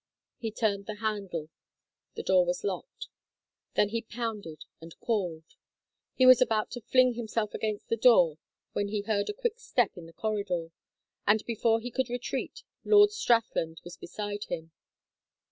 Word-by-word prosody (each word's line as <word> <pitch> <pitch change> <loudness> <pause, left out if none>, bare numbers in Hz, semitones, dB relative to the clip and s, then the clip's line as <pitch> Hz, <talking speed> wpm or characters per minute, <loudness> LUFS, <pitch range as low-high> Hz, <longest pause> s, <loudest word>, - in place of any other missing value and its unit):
He 225 - -2
turned 205 -3 -1
the 215 - -4
handle. 200 -7 -3 0.6
The - - -5
door - - +4
was - - -2
locked. 485 +3 -4 0.7
Then 205 - +3
he 230 +2 -2
pounded 220 -8 -5 0.2
and 165 0 -12
called. 180 -8 -1 0.7
He 255 - +4
was 255 -1 +8
about 220 -3 +1
to 245 - -6
fling 255 +2 +4
himself 225 -2 -2
against 215 -2 -3
the 230 - 0
door 180 -10 +5 0.3
when 205 - 0
he 205 0 -2
heard 205 -1 -1
a - - -1
quick 475 0 -2
step 260 - 0
in 170 -2 -10
the 165 - -15
corridor, 195 -4 -2 0.6
and 215 +1 +3
before 225 0 +1
he 245 +2 -6
could 260 +1 -1
retreat 245 0 -4 0.2
Lord 415 -1 +6
Strathland 230 - +1
was 175 0 -9
beside 205 +3 -5
him. 160 0 -6
220 Hz, 160 wpm, -29 LUFS, 200-245 Hz, 0.7 s, was